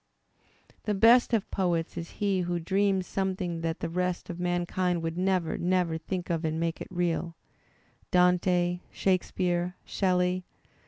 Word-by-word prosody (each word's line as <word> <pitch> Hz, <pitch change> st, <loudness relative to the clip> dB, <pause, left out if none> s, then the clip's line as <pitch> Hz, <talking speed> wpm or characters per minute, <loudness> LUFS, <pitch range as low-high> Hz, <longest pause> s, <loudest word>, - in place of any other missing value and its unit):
The 210 Hz, -, 0 dB
best 235 Hz, +5 st, +6 dB
of 225 Hz, -4 st, 0 dB
poets 175 Hz, -4 st, 0 dB
is 170 Hz, -, -5 dB
he 200 Hz, -2 st, +1 dB
who 175 Hz, 0 st, -1 dB
dreams 190 Hz, +2 st, +1 dB
something 185 Hz, -3 st, -2 dB
that 165 Hz, +1 st, -2 dB
the -, -, -1 dB
rest 180 Hz, +1 st, -2 dB
of 175 Hz, -, -8 dB
mankind 175 Hz, 0 st, 0 dB
would 165 Hz, 0 st, -2 dB
never, 185 Hz, -2 st, 0 dB
never 180 Hz, -2 st, +1 dB
think 175 Hz, +2 st, -4 dB
of 165 Hz, 0 st, -1 dB
and 160 Hz, 0 st, -1 dB
makes 165 Hz, 0 st, -2 dB
it -, -, -5 dB
real 175 Hz, -1 st, -1 dB, 0.4 s
— -, -, -36 dB
Dante, 180 Hz, 0 st, +3 dB
Shakespeare, 180 Hz, -1 st, 0 dB
Shelley. 180 Hz, -1 st, +1 dB
180 Hz, 150 wpm, -28 LUFS, 170-185 Hz, 0.4 s, best